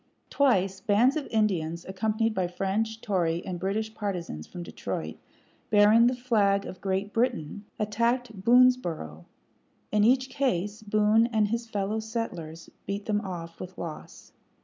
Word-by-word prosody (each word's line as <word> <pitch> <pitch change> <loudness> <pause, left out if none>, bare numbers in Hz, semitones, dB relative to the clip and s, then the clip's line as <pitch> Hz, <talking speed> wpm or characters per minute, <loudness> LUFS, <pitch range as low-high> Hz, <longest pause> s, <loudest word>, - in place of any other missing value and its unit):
Twice 195 -9 +2
bands 225 +6 +3
of 305 -3 -3
Indians, 175 -7 0
accompanied 215 +3 0
by 185 -3 0
French, 210 +5 -2
Tory, 175 -5 0
and 180 -2 -4
British 215 +4 -2
partizans 180 - -4
from 175 - -8
Detroit, - - -5 0.5
bearing 215 +2 +6
the 250 - +1
flag 210 -5 +2
of 185 - -9
Great 195 +1 -2
Britain, 220 -5 -1
attacked 230 0 -1
Boonesboroug. 230 - +3 0.7
In 210 -1 +3
each 255 +3 +4
case 210 -6 -1
Boone 215 +2 +3
and 215 -3 +1
his 230 +1 -3
fellow 205 +1 -1
settlers 180 -8 -5 0.2
beat 200 +1 -3
them 210 -1 0
off 170 -4 -7
with 185 0 -8
loss. 165 -3 -8
210 Hz, 140 wpm, -27 LUFS, 185-225 Hz, 0.7 s, bearing